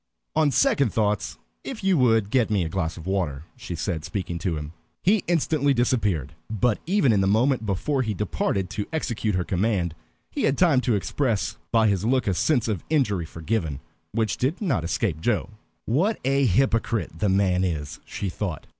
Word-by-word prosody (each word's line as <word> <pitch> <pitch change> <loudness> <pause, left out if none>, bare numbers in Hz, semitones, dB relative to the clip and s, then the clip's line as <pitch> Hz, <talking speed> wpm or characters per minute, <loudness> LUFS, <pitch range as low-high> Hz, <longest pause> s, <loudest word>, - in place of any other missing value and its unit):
"On 155 -1 +4
second 225 - +3
thoughts 105 -3 0 0.3
if 245 -7 -6
you 190 -1 +3
would 115 -7 +3
get 125 -4 +3
me 100 -4 +2
a - - -3
glass 85 -2 -2
of 80 - -9
water" 90 -8 -1
she 85 - -6
said, 80 -2 -3
speaking 90 -2 -4
to 85 -1 -1
him. 75 +1 -6 0.3
He 200 +1 +3
instantly 155 -4 +2
disappeared; 105 - 0 0.2
but 110 +1 +1
even 175 - +3
in 100 - +3
the 95 - +2
moment 115 +3 +2
before 130 +9 0
he 110 -4 -2
departed 95 -1 -1
to 105 - -3
execute 115 - -1
her 90 - +1
command 90 -2 0 0.4
he - - -1
had 135 - +2
time 160 -8 +4
to 120 -3 +1
express 110 +2 -1
by 115 -1 +4
his 100 -2 +1
look 125 +1 +2
a 100 - +1
sense 120 - +1
of 105 -7 -2
injury 105 - +1
forgiven, 80 -3 -3 0.3
which 110 0 0
did 140 +8 0
not 135 - 0
escape 85 -1 -1
Joe. 120 +2 0 0.3
"What 175 - +1
a 135 0 +3
hypocrite 115 +1 +1
the 105 - +2
man 95 -1 +2
is!" 75 -5 -3
she 100 - -5
thought. 90 -3 -4
110 Hz, 185 wpm, -25 LUFS, 90-130 Hz, 0.4 s, On